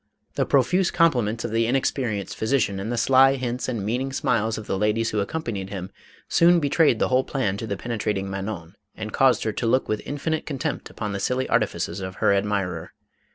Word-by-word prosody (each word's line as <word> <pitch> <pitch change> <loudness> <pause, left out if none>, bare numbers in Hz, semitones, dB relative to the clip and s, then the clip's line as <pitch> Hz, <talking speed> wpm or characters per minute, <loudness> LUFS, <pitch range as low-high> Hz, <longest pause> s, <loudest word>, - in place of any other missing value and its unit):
The - - 0
profuse 170 +7 +3
compliments 120 -10 +2
of - - -3
the 115 0 +1
inexperienced 120 -5 -1
physician 110 -4 0
and 105 +4 -4
the 120 - -1
sly 135 +3 +5
hints 125 -1 -3
and 110 -6 -3
meaning 125 +5 -1
smiles 115 -4 0
of 110 - -7
the - - -2
ladies 105 +3 +1
who 105 - 0
accompanied 100 -4 -3
him, 95 -1 -6 0.4
soon 170 +1 +5
betrayed 145 -3 +3
the - - +1
whole 130 +1 +3
plan 130 -10 -1
to 110 - -5
the 100 -2 -3
penetrating 105 -3 -2
Manon 95 -3 -5 0.2
and 110 -1 -6
caused 135 -2 +3
her 110 - 0
to 115 +2 -2
look 130 +3 +2
with 110 -1 -1
infinite 155 +2 -3
contempt 145 0 -3
upon 105 -2 -5
the 100 - -3
silly 130 +5 0
artifices 85 - 0
of 95 0 -6
her 100 - +3
admirer. 100 -4 -1
115 Hz, 200 wpm, -24 LUFS, 100-135 Hz, 0.4 s, sly